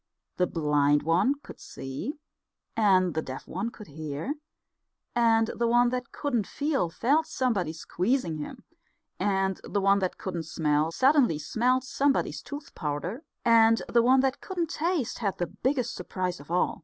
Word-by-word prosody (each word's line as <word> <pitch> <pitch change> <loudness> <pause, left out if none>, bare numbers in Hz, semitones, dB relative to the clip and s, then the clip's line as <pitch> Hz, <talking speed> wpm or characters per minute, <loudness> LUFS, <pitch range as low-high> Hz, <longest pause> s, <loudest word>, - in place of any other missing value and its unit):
The 180 - +2
blind 145 -2 +2
one 180 - +3
could - - -11
see; 135 - -6 0.6
and 190 -5 +4
the 160 - 0
deaf 130 -3 -7
one 235 - -3
could 215 -2 -12
hear; 155 - -4 0.8
and 225 -1 +3
the 235 - +1
one 240 +1 +4
that 250 -1 -4
couldn't 245 -8 -1
feel 285 - 0
felt 285 - +1
somebody 215 -11 0
squeezing 175 - -1
him; 235 - -7 0.6
and 195 -1 0
the 205 - -1
one 200 0 +4
that 185 -2 -2
couldn't 170 -4 -4
smell 155 -1 +1
suddenly 260 - +4
smelt 245 +12 +1
somebody's 275 +1 0
tooth 285 0 -8
powder; 155 - -3 0.2
and 225 -1 +5
the 235 - +4
one 260 +3 +5
that 270 0 0
couldn't 345 -4 -3
taste 330 -6 -1
had 200 -5 -1
the 175 - 0
biggest 255 - -1
surprise 180 -1 -3
of 145 - -14
all. 180 +1 +1
215 Hz, 155 wpm, -28 LUFS, 165-255 Hz, 0.8 s, and